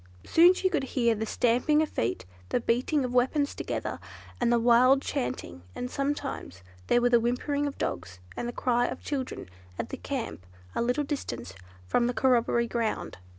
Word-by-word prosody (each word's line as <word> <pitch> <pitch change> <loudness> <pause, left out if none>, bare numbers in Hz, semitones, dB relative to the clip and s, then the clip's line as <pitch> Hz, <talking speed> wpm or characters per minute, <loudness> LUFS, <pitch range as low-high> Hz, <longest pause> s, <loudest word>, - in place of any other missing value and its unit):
Soon 350 +3 +6
she 375 - +1
could 350 -7 0
hear 235 -2 +4
the 220 0 -3
stamping 250 +8 +2
of - - -2
feet, 115 +2 -2 0.2
the - - +1
beating 255 +5 +1
of 250 - -4
weapons 275 +4 +2
together, - - -4 0.4
and 240 -1 +2
the 240 - +4
wild 245 +3 +5
chanting; 105 -8 -3
and 250 0 -4
sometimes 275 - -3 0.2
there 240 - +4
were 245 0 +3
the 240 - +6
whimperings 285 +5 0
of 280 - -6
dogs, 85 +1 -4 0.2
and 240 - -3
the - - -2
cry 245 0 +1
of - - -6
children 270 - -4 0.3
at - - -4
the - - -5
camp 85 +3 -4 0.3
a - - -1
little 250 +5 +1
distance 120 - -5 0.3
from 235 - +2
the 245 - -2
corroboree 235 -2 +3
ground. 230 - -2
245 Hz, 180 wpm, -28 LUFS, 230-275 Hz, 0.4 s, Soon